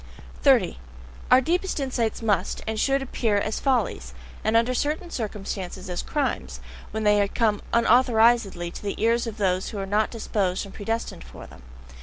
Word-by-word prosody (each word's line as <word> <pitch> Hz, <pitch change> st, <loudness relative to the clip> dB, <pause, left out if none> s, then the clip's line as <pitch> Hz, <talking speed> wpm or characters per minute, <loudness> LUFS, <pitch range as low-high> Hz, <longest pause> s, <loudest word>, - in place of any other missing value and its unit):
30. 65 Hz, -, +4 dB, 0.5 s
Our 255 Hz, -, +7 dB
deepest 355 Hz, +5 st, -1 dB
insights 245 Hz, -5 st, -1 dB
must 200 Hz, -4 st, 0 dB
and 220 Hz, 0 st, -2 dB
should 275 Hz, +2 st, +2 dB
appear 225 Hz, -5 st, 0 dB
as 215 Hz, +2 st, -1 dB
follies, 210 Hz, -, -1 dB, 0.3 s
and 220 Hz, +1 st, +3 dB
under 235 Hz, +2 st, +2 dB
certain 310 Hz, +7 st, -2 dB
circumstances 195 Hz, -4 st, -5 dB
as 175 Hz, -, -2 dB
crimes, 290 Hz, -3 st, -2 dB, 0.3 s
when 220 Hz, 0 st, -3 dB
they 205 Hz, -1 st, +4 dB
come 215 Hz, -1 st, 0 dB
unauthorizedly 230 Hz, -6 st, +3 dB
to -, -, -8 dB
the 200 Hz, -1 st, -3 dB
ears 230 Hz, +2 st, +2 dB
of 225 Hz, -1 st, -6 dB
those 185 Hz, -3 st, 0 dB
who 215 Hz, -, -7 dB
are 195 Hz, -, -3 dB
not 210 Hz, +2 st, +1 dB
disposed 200 Hz, -5 st, -1 dB
and 195 Hz, -, -12 dB
predestined 225 Hz, +2 st, -4 dB
for -, -, -11 dB
them. -, -, -15 dB
220 Hz, 165 wpm, -25 LUFS, 200-240 Hz, 0.5 s, Our